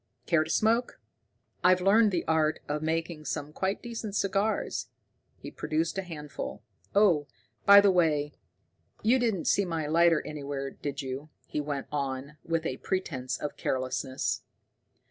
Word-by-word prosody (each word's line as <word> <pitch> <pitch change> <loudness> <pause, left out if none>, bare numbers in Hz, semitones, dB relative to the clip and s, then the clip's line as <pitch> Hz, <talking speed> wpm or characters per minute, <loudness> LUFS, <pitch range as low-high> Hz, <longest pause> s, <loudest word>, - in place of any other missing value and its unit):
Care 160 -2 +3
to 155 - -9
smoke? 230 +6 +1 0.6
I've 180 +1 +6
learned 210 +4 +5
the 180 -4 -1
art 160 -1 +2
of 150 +1 -2
making 160 0 -2
some 150 +1 -4
quite 190 +4 -2
decent 225 -4 -5
cigars." 200 +2 0 0.5
He - - -9
produced 160 +1 -1
a - - 0
handful. 150 - -7 0.3
"Oh, 175 -8 +4 0.4
by 200 0 +10
the 200 -1 +5
way, 150 -5 +2 0.7
you 245 +4 +4
didn't 225 -8 0
see 200 - +3
my 165 -4 -2
lighter 165 +1 +4
anywhere, 140 -2 -4
did 140 -1 -5
you?" 135 +3 -5 0.2
he 150 - -3
went 145 -2 -3
on, 140 0 -3
with 165 -1 -1
a 130 - -2
pretense 135 -9 -2
of 150 - -5
carelessness. 130 0 -1
160 Hz, 145 wpm, -29 LUFS, 145-190 Hz, 0.7 s, by